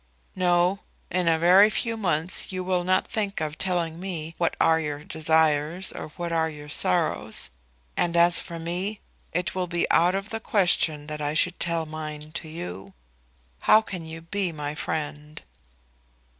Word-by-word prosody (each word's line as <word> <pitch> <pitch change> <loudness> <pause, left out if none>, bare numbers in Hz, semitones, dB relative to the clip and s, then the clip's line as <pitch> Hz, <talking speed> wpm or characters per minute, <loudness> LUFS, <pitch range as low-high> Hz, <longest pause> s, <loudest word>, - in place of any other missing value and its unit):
"No. 180 +1 +2 0.3
In 180 -1 +1
a 165 -1 +4
very 185 +5 +7
few 230 +2 -2
months 180 -5 +1
you 185 -1 -3
will 180 -1 0
not 185 +1 +2
think 205 -2 -2
of 155 -1 -3
telling 170 -3 0
me 165 -4 -4
what 170 - +1
are 160 0 +4
your 150 -2 -4
desires 160 +2 +1
or - - -6
what 175 -1 -3 0.2
your 150 -1 -10
sorrows; 90 - 0 0.4
and 170 -1 +1
as 170 0 +5
for 170 - -7
me, 180 +6 -3 0.3
it 180 +2 -1
will 185 -1 -1
be 175 0 0
out 175 +3 +4
of 195 +2 -4
the 225 - -2
question 175 -8 +2
that 150 0 -5
I 145 +1 -1
should 175 +3 +2
tell 170 -1 0
mine 155 -1 -7
to 160 -1 -6
you. 95 - -7 0.7
How 215 - +6
can 180 -5 -6
you 160 +1 -8
be 185 +2 -1
my 150 -2 -4
friend?" 150 0 -4
170 Hz, 165 wpm, -26 LUFS, 155-185 Hz, 0.7 s, very